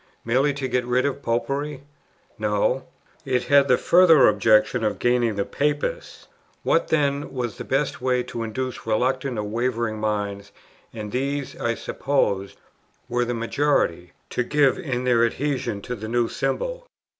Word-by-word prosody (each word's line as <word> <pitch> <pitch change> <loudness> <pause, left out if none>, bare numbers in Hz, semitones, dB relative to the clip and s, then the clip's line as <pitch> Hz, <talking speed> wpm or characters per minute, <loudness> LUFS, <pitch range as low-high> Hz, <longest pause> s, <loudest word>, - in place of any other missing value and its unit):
merely 130 +5 +2
to 135 -1 -3
get 125 0 0
rid 125 +2 +1
of 140 0 -2
"Popery?" 140 +4 -2 0.6
No; 105 +5 0 0.4
it 130 -2 0
had 140 -1 +4
the 125 - +4
further 170 -4 +6
object 105 +1 +4
of 110 -4 -1
gaining 120 -3 +1
the 100 - -1
"Papists." 145 0 -2 0.4
What 165 - +2
then 145 -2 0
was 120 -4 -3
the - - -4
best 135 0 -1
way 125 -1 +1
to 115 - -6
induce 120 +2 -4
reluctant 130 +3 0
or 105 - -1
wavering 115 0 -2
minds, 100 -2 -3 0.4
and 105 -2 -7
these, 140 +3 -2
I 115 0 -1
supposed, 100 -10 -1 0.5
were 120 0 0
the 120 0 -2
majority, 115 - 0 0.2
to - - 0
give 145 +4 +2
in 130 -8 -3
their 120 -2 +3
adhesion 125 -4 -1
to 125 - -4
the 110 -1 -7
new 120 +1 +1
symbol? - - -3
125 Hz, 155 wpm, -23 LUFS, 110-140 Hz, 0.6 s, further